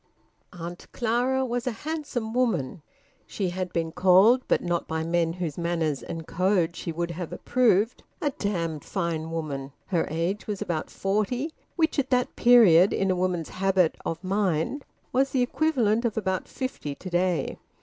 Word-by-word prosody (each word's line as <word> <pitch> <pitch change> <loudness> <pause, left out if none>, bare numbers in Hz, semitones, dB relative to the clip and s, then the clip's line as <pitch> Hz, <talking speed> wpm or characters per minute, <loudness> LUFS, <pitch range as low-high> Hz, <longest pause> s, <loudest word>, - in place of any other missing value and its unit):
Aunt 175 -1 -8
Clara 250 +3 +1
was 245 +1 -2
a - - +2
handsome 285 -8 -3
woman. 220 - 0 0.5
She 195 -3 -2
had 185 0 -3
been 165 -2 -1
called 190 +8 +5
but - - +2
not 175 -1 -1
by 160 0 -2
men 165 0 +1
whose 175 -3 -4
manners 165 -4 -1
and 165 -1 -6
code 180 0 +1
she 170 - -4
would 170 +1 -2
have 170 -1 -5
approved 230 -3 +2 0.2
`a 290 -3 -1
damned 165 -7 -2
fine 170 -4 -2
woman.' 145 -4 -4
Her 175 -4 0
age 170 +6 -2
was 205 -2 -3
about 160 -3 -3
forty, 215 +10 -1 0.2
which 320 -3 +1
at 270 - 0
that 250 -1 +1
period, 205 -7 +6
in 195 -1 +1
a - - +1
woman's 180 -3 -1
habit 185 -3 +2
of 165 +2 -4
mind, 195 - 0 0.3
was 270 +2 +3
the 260 -2 +2
equivalent 245 -5 +1
of 235 -3 -1
about 190 -3 -1
fifty 255 - -5
to 185 - -8
day. 175 -1 0
185 Hz, 165 wpm, -26 LUFS, 165-240 Hz, 0.5 s, period